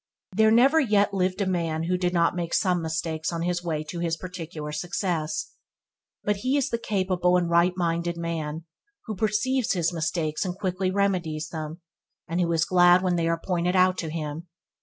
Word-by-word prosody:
There 220 +1 +5
never 260 +8 +5
yet 205 -7 +2
lived 185 0 0
a - - +2
man 165 -3 -1
who 180 +2 0
did 180 -1 0
not 170 -1 +2
make 170 -1 -2
some 180 -3 +2
mistakes 160 0 -2
on 170 -1 -3
his 175 0 -1
way 155 -3 -2
to 165 +3 -6
his 170 -1 -1
particular 165 -4 -7
success, 170 0 -2 0.7
but 205 -1 0
he 255 +7 0
is 280 0 0
the 230 - -1
capable 185 -4 +1
and 175 -1 0
right 170 +1 +3
minded 170 -1 -1
man 165 -1 -4 0.4
who 220 - -4
perceives 220 +5 +1
his 175 -1 0
mistakes 155 -1 -1
and 180 -2 -3
quickly 185 -1 -1
remedies 180 -6 -1
them, 160 +1 -6 0.5
and 170 +3 -1
who 170 -1 +1
is 165 0 +2
glad 180 0 +5
when 180 -1 +1
they 165 -1 0
are 165 0 0
pointed 180 0 0
out 185 0 +4
to 165 - -3
him. 155 +1 -5
175 Hz, 190 wpm, -26 LUFS, 165-185 Hz, 0.7 s, There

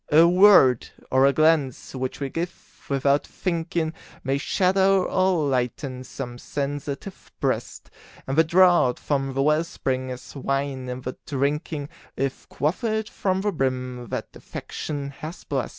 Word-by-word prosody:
A 160 +3 +7
word 180 - +6 0.2
or 130 +1 +5
a - - +5
glance 140 -10 +2
which 130 -1 -4
we 140 -1 -2
give 170 +5 -7
"without 140 +1 +2
thinking", 170 -2 -2 0.3
May 135 +1 0
shadow 190 +4 +3
or 185 -5 +2
lighten 130 0 -2
some 125 -1 -7
sensitive 145 +6 -5
breast; - - -2 0.3
And 135 - -2
the 160 - +6
draught 175 -6 +5
from 135 -2 -1
the 135 - +2
well 150 +2 +3
spring 130 -6 -3
is 125 +2 -8
wine 135 -1 -2
in 125 +1 -5
the 130 0 -6
drinking, 145 +1 -1 0.3
If 135 0 -3
quaffed 215 - -1
from 190 -1 0
the 205 +1 0
brim 125 -5 -2
that - - -4
Affection 145 -2 -6
has 155 +5 -8
blest. 135 -4 -2
140 Hz, 145 wpm, -24 LUFS, 130-170 Hz, 0.3 s, A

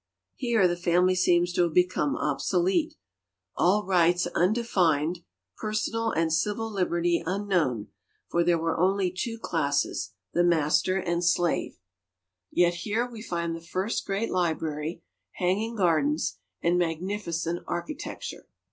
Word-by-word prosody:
Here 230 -6 +2
the 175 - 0
family 180 +1 +3
seems 175 -1 +2
to 180 - +2
have 170 -3 +1
become 185 +10 +2
obsolete, 180 - 0 0.6
all 200 +4 +2
rights 180 -1 +3
undefined, 180 -5 +2 0.4
personal 225 +1 -1
and 165 -5 0
civil 210 +7 0
liberty 175 -3 +1
unknown, 175 - 0 0.4
for 170 - +1
there 170 0 +3
were 165 0 -1
only 190 0 +2
two 230 +4 -3
classes, 145 - -1 0.2
the 175 - +3
master 160 +1 +2
and 175 -2 -1
slave. 175 0 +1 0.7
Yet 175 0 +3
here 220 +7 -1
we 230 -3 -10
find 170 -5 -2
the 165 - -8
first 185 +6 -2
great 200 +3 -1
library, 160 -2 -2 0.3
hanging 205 +6 -1
gardens, 155 - +1 0.2
and 175 +1 +3
magnificent 170 0 -2
architecture. 270 - -5
175 Hz, 125 wpm, -27 LUFS, 165-195 Hz, 0.7 s, family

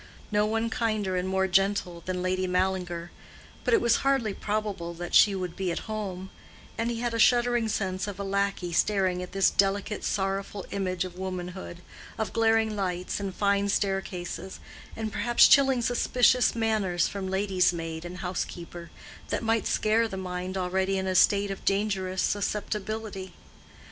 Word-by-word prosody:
No 210 0 +2
one 225 +1 -1
kinder 215 -5 -1
and 180 +1 -1
more 190 0 +1
gentle 190 -2 +1
than 180 -1 -2
Lady 185 0 0
Mallinger; 180 -2 -1 0.5
but - - 0
it 445 - +2
was 235 0 +4
hardly 270 -7 +1
probable 205 -5 -3
that 175 0 -7
she 200 -2 +6
would 180 -2 -4
be 185 -2 -1
at - - -4
home; 195 -4 -5 0.4
and 230 +1 -1
he 235 -1 -3
had 240 -1 -1
a 230 - -2
shuddering 240 -1 +4
sense 190 -2 -2
of 200 -1 -6
a - - -2
lackey 195 -3 -1
staring 185 -1 +1
at 180 - -7
this 195 +1 +3
delicate, 200 +2 0
sorrowful 195 0 -2
image 185 -2 -1
of 180 0 -9
womanhood—of 185 +3 -6
glaring 225 -1 +2
lights 185 -2 -2
and 195 -2 -4
fine 200 0 +1
staircases, 190 -2 -2 0.4
and 220 -1 -4
perhaps 235 +4 +5
chilling 270 -3 +5
suspicious 245 +1 +3
manners 210 -6 +1
from 195 -2 -5
lady's 190 -2 +2
maid 165 -1 -5
and 175 +1 -7
housekeeper, 175 -1 -5 0.4
that - - -1
might 225 0 +1
scare 225 +2 +2
the 195 - -6
mind 185 0 -4
already 190 +1 0
in 190 - -2
a 190 - 0
state 200 +2 +4
of 195 - -7
dangerous 195 -2 0
susceptibility. 205 -1 -3
195 Hz, 160 wpm, -27 LUFS, 185-215 Hz, 0.5 s, she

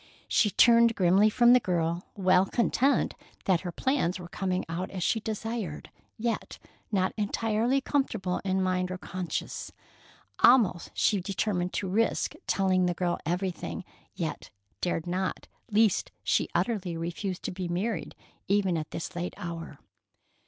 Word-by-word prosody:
She 210 - +3
turned 235 +2 +5
grimly 190 +3 +4
from 240 +3 +5
the 250 - +7
girl, 170 -3 -1
well 185 -1 +4
content 260 +5 +2 0.3
that 185 -3 +3
her 180 - -4
plans 220 - 0
were 180 -2 -8
coming 185 +1 -2
out 170 +3 -3
as 185 -3 -4
she 225 - +2
desired, 220 -6 -4 0.3
yet 230 +1 -3 0.3
not 190 -3 +1
entirely 225 +5 +1
comfortable 225 -11 -1
in 190 -1 +1
mind 185 -1 0
or 185 - -4
conscience. 185 -1 -4 0.7
Almost 230 -8 +5
she 205 -3 +2
determined 185 -1 -1
to 190 - -2
risk 220 +5 +1
telling 185 -2 +2
the 175 - -1
girl 175 -1 -1
everything, 180 +1 -2 0.3
yet - - -4 0.3
dared 175 -2 -1
not, 185 +2 -2 0.2
lest 215 0 +3
she - - +1
utterly 195 -8 0
refuse 175 +3 -3
to - - -5
be 180 0 -4
married 180 +3 -2 0.3
even 195 -3 +2
at 155 - -6
this 170 +2 -6
late 175 +1 -3
hour. 165 -3 -6
190 Hz, 145 wpm, -28 LUFS, 180-220 Hz, 0.7 s, the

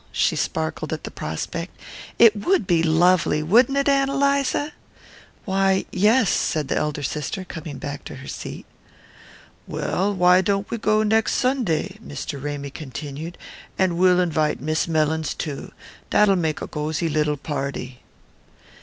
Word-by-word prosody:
She - - +1
sparkled 80 0 -2
at - - -5
the - - -6
prospect. 165 - -5 0.4
"It 230 -2 +7
would 220 - +1
be 170 -2 +3
lovely, 165 -1 +3
wouldn't 240 - +4
it, 280 - +1
Ann 275 -1 +3
Eliza?" 280 +1 +1 0.7
"Why, 190 -1 +2
yes," 210 +3 +3
said 150 -3 0
the - - +1
elder 150 -1 -1
sister, 150 +7 -3
coming 160 -5 -7
back 145 0 -6
to - - -7
her 130 0 -10
seat. - - -7 1.0
"Well, 195 +3 -1
why 180 0 +5
don't 200 +1 0
we 235 - -2
go 215 +1 +2
next 220 +1 +2
Sunday?" 215 - 0
Mr. 140 -10 -6
Ramy 145 -1 -4
continued. 145 +4 -7 0.4
"And 185 -3 +2
we'll 180 +1 +4
invite 160 -4 +1
Miss 155 +4 -1
Mellins 160 -1 0
too 145 -3 -5 0.4
that'll 210 -2 +4
make 160 -4 -1
a - - -5
gosy 155 +2 -2
little 150 -1 0
party." 135 -3 -5
170 Hz, 145 wpm, -23 LUFS, 150-205 Hz, 1.0 s, It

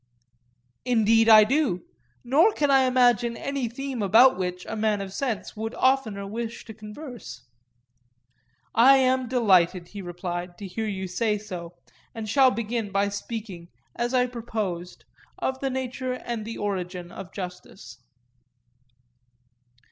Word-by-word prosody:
Indeed 225 -2 +3
I 215 -1 +10
do; 255 - 0 0.4
nor 300 - +4
can 290 -5 +1
I 270 -1 +5
imagine 245 -2 +3
any 275 -4 -3
theme 265 0 -5
about 230 +7 +6
which 180 -1 -4
a - - -5
man 215 -1 +1
of 195 -1 -6
sense 235 -3 -3
would 225 +2 -5
oftener 255 -7 +1
wish 225 +3 -5
to 220 - -9
converse. 215 - -10 1.3
I 265 +4 +7
am 260 -1 +2
delighted, 185 -7 +3
he 205 - -8
replied, 175 0 -5
to 205 - -8
hear 215 +4 -4
you 190 -2 -3
say 210 +3 0
so, 180 -5 -8 0.4
and 220 -1 -5
shall 265 +4 +5
begin 230 -3 -3
by 200 +1 +1
speaking, 200 -4 -6 0.3
as 240 +2 -1
I 250 0 +4
proposed, 215 -8 -5 0.3
of 265 0 -2
the 270 - -1
nature 255 0 -3
and 235 -3 -5
origin 180 -3 -4
of 190 -2 -9
justice. 180 -2 -9
220 Hz, 135 wpm, -25 LUFS, 195-250 Hz, 1.3 s, I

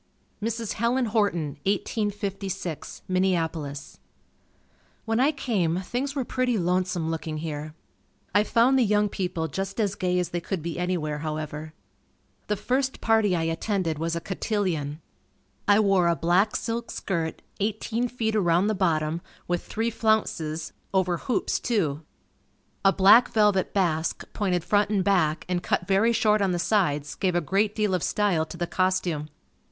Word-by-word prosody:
Mrs. 225 0 -2
Helen 240 +3 +1
Horton 200 - 0
1856, 195 -4 -3
Minneapolis. 165 -6 -1 1.1
When 225 0 0
I 275 +4 +4
came, 190 - 0
things 260 +8 -3
were 265 -3 -1
pretty 250 -2 0
lonesome 180 -2 0
looking 160 -1 -4
here. 155 -1 -5 0.6
I 205 +1 +5
found 240 +5 +3
the - - +5
young 210 -1 +2
people 175 -4 -2
just 195 - -4
as 205 -3 +1
gay 180 -2 0
as 180 -2 0
they 175 -1 -3
could 180 -2 -4
be 170 0 -4
anywhere, 165 -5 -1
however. 155 0 -5 0.7
The 210 - +1
first 260 +6 -1
party 220 -4 +3
I 165 - 0
attended 165 -1 -1
was 165 +1 -1
a - - -1
cotillion. 175 -6 -2 0.7
I 205 0 +6
wore 195 -4 +3
a 170 - +3
black 175 +7 +2
silk 230 0 -3
skirt, 165 -4 -3 0.2
eighteen 220 +3 -1
feet 225 -3 -2
around 175 -2 +3
the 215 - +1
bottom, 165 -4 0 0.3
with 175 0 -1
three 225 +2 -2
flounces, 165 -9 0 0.2
over 180 -2 +2
hoops 250 - -1
too. 165 - 0 0.8
A 195 - +6
black 200 +6 +7
velvet 210 -3 +2
basque 170 -5 0
pointed 180 -5 0
front 205 +3 +2
and 200 -3 +1
back, 175 -6 +2
and 180 -1 -1
cut 180 - 0
very 195 +5 +3
short 215 -2 +3
on 190 -2 +2
the - - 0
sides 150 -7 +1
gave 185 -3 0
a - - +4
great 195 +6 0
deal 210 -3 +1
of 180 - +1
style 180 -6 +1
to 170 - -9
the 175 - -1
costume. 180 -4 0
190 Hz, 155 wpm, -26 LUFS, 165-210 Hz, 1.1 s, black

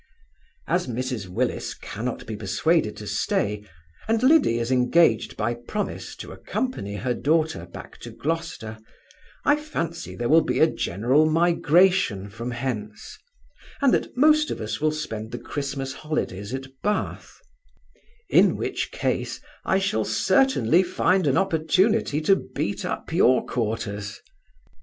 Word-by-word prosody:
As 175 -3 0
Mrs 125 -4 -3
Willis 90 - -2
cannot - - -5
be - - -5
persuaded - - 0
to - - -8
stay, 105 0 -1 0.4
and 225 +1 +1
Liddy 270 - +5
is 120 +1 -2
engaged 125 -1 +3
by 120 +3 0
promise 120 - -5
to - - -9
accompany 175 - -4
her 120 +5 -1
daughter 155 - 0
back 85 - -11
to - - -8
Gloucester, 160 -9 -4 0.7
I 290 - +5
fancy 170 - -4
there 120 - -2
will 160 +4 +6
be - - -1
a - - +7
general 135 - +1
migration 165 - +3
from 115 +3 -5
hence, 115 -4 -5 0.6
and 275 -4 +4
that - - -1
most 305 +2 +5
of - - -4
us 110 +5 -4
will 155 0 +3
spend 110 -8 -5
the 120 - -4
Christmas 135 0 -4
holidays 110 -10 -4
at 135 0 -4 0.2
Bath; 210 0 -2 0.9
in - - +5
which - - -3
case, - - -2 0.3
I 190 - +2
shall 190 - 0
certainly 185 - +3
find 185 -1 +1
an 135 - +3
opportunity 185 0 +2
to 195 +5 +4
beat 130 - -4
up - - -4
your 130 +1 +4
quarters. 105 -3 -3
140 Hz, 140 wpm, -24 LUFS, 115-180 Hz, 0.9 s, a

